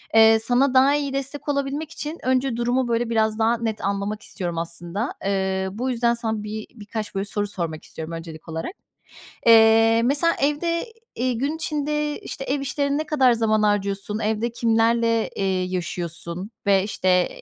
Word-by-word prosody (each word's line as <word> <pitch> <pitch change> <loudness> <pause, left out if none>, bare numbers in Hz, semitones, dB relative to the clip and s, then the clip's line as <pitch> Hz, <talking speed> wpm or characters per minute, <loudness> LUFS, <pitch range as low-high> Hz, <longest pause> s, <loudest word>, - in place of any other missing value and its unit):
Eee, 225 0 +7
sana 250 +4 +2
daha 270 +2 +5
iyi 280 -2 -2
destek 275 +2 -3
olabilmek 285 +2 -2
için 305 +3 -5
önce 255 -1 +1
durumu, 245 +1 +1
böyle, 235 0 0
biraz 220 -1 +1
daha 230 +1 +3
net 225 -2 -3
anlamak 200 +2 -2
istiyorum 175 -6 -5
aslında. 170 +7 -3
Eee, 190 -1 0
bu 250 +6 -3
yüzden 235 0 +2
sana 220 -3 -2
bir 215 0 -6
birkaç, 215 -1 -6
böyle, 195 - -1
soru 205 0 -2
sormak 170 -5 -4
istiyorum 160 +1 -7
öncelik 165 0 -8
olarak. 160 - -4 0.8
Eee, 225 0 +6
mesela 295 +6 +3
evde, 335 +5 0 0.3
eee, 250 +1 0
gün 280 +7 -1
içinde, 300 -1 -2
işte, 270 - -6
ev 280 +2 -1
işlerine 280 +1 -1
ne 310 - -2
kadar 265 -5 +4
zaman 215 -2 +2
harcıyorsun, 205 0 0
evde 220 +2 -1
kimlerle, 230 0 +2
eee, 190 -1 0
yaşıyorsun 175 +1 -4
ve, 195 -1 +4
işte, 185 -3 +1
225 Hz, 160 wpm, -23 LUFS, 200-265 Hz, 0.8 s, Eee